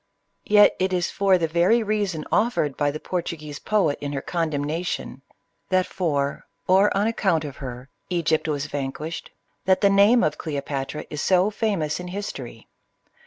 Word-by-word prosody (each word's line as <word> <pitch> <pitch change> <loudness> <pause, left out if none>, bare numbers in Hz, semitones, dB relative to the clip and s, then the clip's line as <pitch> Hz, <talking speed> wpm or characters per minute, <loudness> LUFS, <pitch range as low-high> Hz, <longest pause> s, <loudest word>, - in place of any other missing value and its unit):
Yet 205 0 +6
it 185 0 0
is 180 -1 0
for 195 -2 +3
the 165 -2 0
very 175 +8 +3
reason 205 -7 -1
offered 185 - +1
by 145 -1 +1
the 150 +2 -4
Portu 175 -1 -3
guese 150 -2 -9
poet 200 -9 +1
in 145 0 -4
her 135 - -2
condemnation 155 -3 -2 0.2
— - - -48
that 185 -1 +3
for, 145 -6 -2 0.2
or 195 +2 +5
on 205 - +2
ac 225 - +1
count 165 -6 +1
of 140 -2 -7
her, 125 -1 -7 0.2
P^gypt 165 -3 +1
was 145 -2 -1
vanquished 150 +3 -5 0.2
— - - -46
that 190 0 +4
the 200 - +5
name 205 +5 +5
of 150 - 0
Cleopatra 140 -1 -4
is 150 - -3
so 185 +2 +3
famous 195 -9 -1
in 180 - -6
history. 200 +3 -6
170 Hz, 175 wpm, -24 LUFS, 150-195 Hz, 0.2 s, Yet